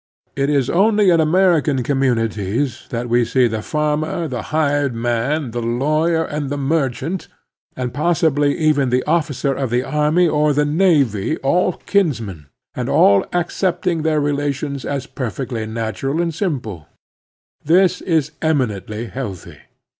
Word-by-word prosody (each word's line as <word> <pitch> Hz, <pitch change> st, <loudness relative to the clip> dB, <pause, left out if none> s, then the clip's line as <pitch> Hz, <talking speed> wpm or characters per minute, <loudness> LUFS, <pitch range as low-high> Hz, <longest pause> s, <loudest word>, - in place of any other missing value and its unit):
It 140 Hz, +1 st, 0 dB
is 140 Hz, -4 st, +2 dB
only 205 Hz, +2 st, +3 dB
in 165 Hz, -, +4 dB
American 160 Hz, -5 st, +2 dB
communities 120 Hz, -2 st, -1 dB
that 120 Hz, 0 st, -3 dB
we 120 Hz, +1 st, +3 dB
see 125 Hz, +1 st, +2 dB
the 110 Hz, -1 st, -3 dB
farmer, 150 Hz, +5 st, -1 dB
the 125 Hz, -5 st, -4 dB
hired 145 Hz, -4 st, 0 dB
man, 120 Hz, +4 st, -1 dB
the 120 Hz, +1 st, -3 dB
lawyer, 155 Hz, +8 st, +1 dB
and 145 Hz, -2 st, -4 dB
the 145 Hz, -, -3 dB
merchant, 140 Hz, +3 st, -1 dB, 0.5 s
and 125 Hz, -1 st, -4 dB
possibly 150 Hz, -2 st, +1 dB
even 150 Hz, -5 st, +2 dB
the 125 Hz, +1 st, +1 dB
officer 150 Hz, -4 st, 0 dB
of 135 Hz, -2 st, -2 dB
the 120 Hz, +2 st, 0 dB
army 150 Hz, +5 st, +2 dB
or 150 Hz, -1 st, +2 dB
the 150 Hz, +1 st, +2 dB
navy, 145 Hz, -, +2 dB
all 180 Hz, +6 st, +2 dB
kinsmen, 115 Hz, -, -1 dB, 0.3 s
and -, -, -3 dB
all 100 Hz, 0 st, +4 dB
accepting 175 Hz, 0 st, -1 dB
their 155 Hz, -1 st, +1 dB
relations 145 Hz, -1 st, -2 dB
as 140 Hz, -2 st, -3 dB
perfectly 120 Hz, -3 st, -4 dB
nattua.1 115 Hz, -, -3 dB
and 170 Hz, -1 st, 0 dB
simple. 120 Hz, -, -4 dB, 0.8 s
This 180 Hz, +3 st, +3 dB
is 160 Hz, -5 st, 0 dB
eminently 115 Hz, -, -1 dB
healthy. 115 Hz, -7 st, -7 dB
145 Hz, 140 wpm, -19 LUFS, 120-160 Hz, 0.8 s, in